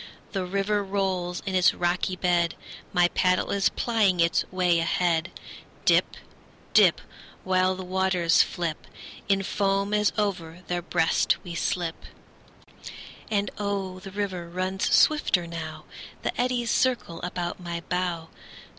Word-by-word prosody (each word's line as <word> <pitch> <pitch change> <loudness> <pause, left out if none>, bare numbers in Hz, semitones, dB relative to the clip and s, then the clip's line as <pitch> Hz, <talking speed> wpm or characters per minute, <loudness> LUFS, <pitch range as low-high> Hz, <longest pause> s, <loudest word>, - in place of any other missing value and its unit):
The 190 -2 -2
river 200 +2 0
rolls 190 -3 -2
in 190 - -3
its 185 -1 +4
rocky 180 +1 0
bed; 175 -2 +1 0.4
My 175 -1 +3
paddle 180 0 +1
is 200 -1 +2
plying 210 -6 +1
its 170 0 +3
way 180 -2 +2
ahead; 165 0 +1 0.6
Dip, - - +3 0.6
dip, - - +5 0.4
While 185 0 +2
the 185 0 -7
waters 185 -2 +3
flip 170 -4 -3 0.4
In 195 0 +2
foam 195 +1 0
as 210 0 +3
over 180 -5 -2
their 175 0 -2
breast 170 -1 +1
we 175 - -7
slip. 165 0 -2 1.2
And 205 -1 0
oh, 195 -2 -3
the 195 +1 -9
river 190 -3 -4
runs 185 +2 -2
swifter 260 - +4
now; 160 -2 -7 0.4
The - - -2
eddies 245 -2 0
circle 240 -10 0
about 180 0 -4
my 170 -1 -5
bow. 175 -2 -2
185 Hz, 130 wpm, -26 LUFS, 175-195 Hz, 1.2 s, dip